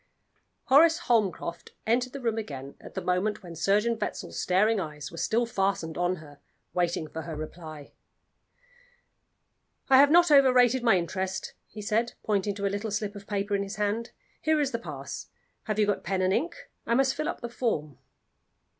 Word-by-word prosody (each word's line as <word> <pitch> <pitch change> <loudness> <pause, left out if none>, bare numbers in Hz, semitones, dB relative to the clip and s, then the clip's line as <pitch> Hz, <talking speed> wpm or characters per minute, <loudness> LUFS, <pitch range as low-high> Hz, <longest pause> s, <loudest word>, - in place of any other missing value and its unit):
Horace 320 +4 +6
Holmcroft 210 - 0
entered 245 +3 +1
the 280 - -6
room 230 -3 -1
again 140 -9 -7
at - - -12
the - - -3
moment 190 +4 0
when 170 -2 -9
Surgeon 210 +7 +2
Wetzel's - - -4
staring 210 +4 +3
eyes 150 -5 -6
were 165 - -10
still 235 +2 +1
fastened 195 -7 -1
on 175 +1 +1
her, 145 -4 -13 0.3
waiting 170 -3 0
for 160 - -6
her 160 0 -6
reply. 155 -1 -8 2.0
"I 260 - +9
have 285 +1 +7
not 345 +1 +6
overrated 260 -3 +6
my 230 -5 +4
interest," 190 +2 -3
he 210 0 -9
said, 225 +3 0
pointing 205 -1 0
to 200 0 -3
a 200 - 0
little 205 +2 -2
slip 210 0 -2
of 200 -1 -10
paper 205 0 -1
in 200 - 0
his 200 +1 -5
hand. 210 +3 -1 0.3
"Here 315 -1 +2
is 285 -2 +1
the 230 - -2
pass. - - -7 0.4
Have 215 -2 -2
you 215 - +4
got 205 -1 -1
pen 185 +1 0
and 185 +1 +2
ink? 340 +10 0 0.3
I 235 - +2
must 265 +1 +3
fill 305 - -2
up - - -5
the 240 - -3
form." 155 - -2
205 Hz, 180 wpm, -28 LUFS, 180-235 Hz, 2.0 s, I